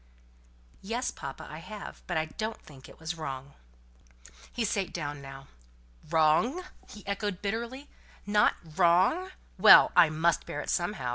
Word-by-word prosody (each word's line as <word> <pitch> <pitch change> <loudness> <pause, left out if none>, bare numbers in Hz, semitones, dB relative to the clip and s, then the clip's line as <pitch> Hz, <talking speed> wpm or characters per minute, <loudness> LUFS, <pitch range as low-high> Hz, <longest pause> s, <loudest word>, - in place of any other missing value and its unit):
"Yes, 235 +6 -2
papa, 135 -2 -8
I 155 - -8
have; 210 +4 -9
but 175 - -1
I 155 - +1
don't 215 +8 -5
think 135 -3 -15
it - - -16
was 160 +1 -4
wrong." 140 -4 -7 1.0
He 235 - -1
sate 195 -2 -1
down 145 -3 -5
now. 135 0 -10 0.6
"Wrong!" 165 - +2 0.3
he 210 - -12
echoed, 200 -1 -3
bitterly. 235 +7 -4 0.4
"Not 210 +1 +3 0.2
wrong? 185 - +3 0.3
Well! - - +9
I 170 -3 +7
must 160 +2 0
bear 145 - -4
it - - -4
somehow. 175 -7 -1
175 Hz, 145 wpm, -29 LUFS, 155-210 Hz, 1.0 s, Well